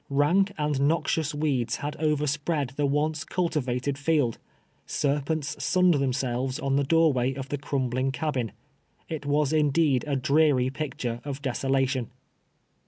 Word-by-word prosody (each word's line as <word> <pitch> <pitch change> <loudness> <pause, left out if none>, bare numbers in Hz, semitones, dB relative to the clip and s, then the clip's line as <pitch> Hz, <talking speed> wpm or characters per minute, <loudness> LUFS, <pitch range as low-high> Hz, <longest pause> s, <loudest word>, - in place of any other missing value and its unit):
Hank 160 +8 +3
and 150 -3 0
noxious 160 -1 0
weeds 140 -6 0
had 145 +1 -4
overspread 150 -1 0
the 140 +1 0
once 150 +2 0
cul 180 -1 -1
tivated 135 -2 -2
lield 145 -8 +2 0.3
— - - -40
serpents 145 +1 -1
sunned 180 -1 +4
themselves 130 -1 -1
on 135 -2 0
the 140 - +2
door 165 +1 +4
way 130 +1 0
of 135 0 -6
the 145 - -2
crumbling 130 -2 -1
cabin. 130 -4 -2 0.6
It 150 -3 -5
was 145 0 +2
indeed 150 -3 +3
a 140 - 0
dreary 140 -1 +3
picture 130 -5 -4
of 140 -1 -6
desolation. 135 -1 0
145 Hz, 145 wpm, -26 LUFS, 130-155 Hz, 0.6 s, sunned